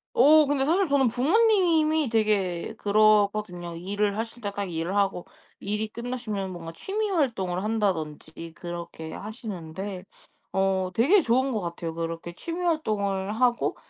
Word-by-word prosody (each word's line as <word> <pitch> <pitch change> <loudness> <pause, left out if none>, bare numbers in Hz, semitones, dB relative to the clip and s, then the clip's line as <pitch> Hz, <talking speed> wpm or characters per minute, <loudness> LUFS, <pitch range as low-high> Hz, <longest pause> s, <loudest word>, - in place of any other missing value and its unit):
어. 300 +4 +7
근데 280 -1 +1
사실 350 +5 +2
저는 275 -3 +3
부모님이 315 - +3
되게 210 -3 0
그러거든요. 205 -4 +2
일을 200 +3 -1
하실 230 +2 -5
때 205 -1 -3
딱 200 -3 -4
일을 165 +4 -2
하고 195 -3 0 0.3
일이 210 +2 -2
끝나시면 220 -5 -4
뭔가 165 -2 -7
취미 415 - -3
활동을 210 - 0
한다든지 165 -6 -2
그렇게 170 -2 -7
하시는데 195 -3 -6 0.5
어 190 -1 +1
되게 335 - +5
좋은 260 +3 +2
것 215 -4 -1
같아요. 170 -1 -5
그렇게 165 +1 -4
취미 340 +1 -5
활동을 205 - 0
하고 240 +1 +1
210 Hz, 305 characters per minute, -26 LUFS, 180-255 Hz, 0.5 s, 어